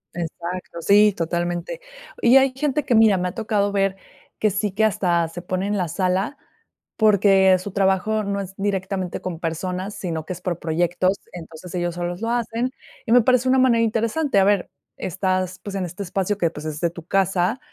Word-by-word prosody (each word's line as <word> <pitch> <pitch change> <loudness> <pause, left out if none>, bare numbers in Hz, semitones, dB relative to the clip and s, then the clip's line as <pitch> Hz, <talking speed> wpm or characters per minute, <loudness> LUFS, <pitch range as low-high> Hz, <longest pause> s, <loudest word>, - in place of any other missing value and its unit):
Exacto, 170 0 -5
sí, 205 +3 +5
totalmente. 175 - -3 0.4
Y 245 +3 +6
hay 265 -1 +4
gente 295 +1 -1
que, 245 - +1
mira, 220 -3 +5
me 180 0 -1
ha - - -6
tocado 210 -2 0
ver, 195 -1 0 0.4
que 215 - +3
sí 205 +1 -1
que 215 +4 0
hasta 175 -5 +1
se 175 +1 -8
pone 185 +1 -2
en 210 - 0
la 180 -3 0
sala, 185 - -1 0.6
porque 195 -3 +5
su 200 +2 -7
trabajo 195 +3 +1
no 200 0 -2
es 190 0 -8
directamente 195 -2 -2
con 175 -3 -5
personas, 180 +4 -3
sino 165 -4 -4
que 185 - -4
es 180 - -11
por 175 -2 -3
proyectos. 175 +4 0
Entonces, 170 0 -10
ellos 175 -1 -2
solos 175 +1 -4
lo 230 - -2
hacen, 235 +1 -1 0.4
y 225 - -1
me 245 - +7
parece 255 +2 +3
una 265 - +4
manera 235 -3 +4
interesante. 230 +3 0
A 195 - +5
ver, 200 -2 +2 0.3
estás, 185 0 -2
pues, 200 -1 -6
en 190 -2 -1
este 180 +4 -6
espacio 195 +2 -1
que, 170 -4 +1
pues, 150 -2 -9
es 155 0 -5
de 170 - +1
tu 170 -2 -10
casa, 190 +4 +1
190 Hz, 195 wpm, -22 LUFS, 175-215 Hz, 0.6 s, me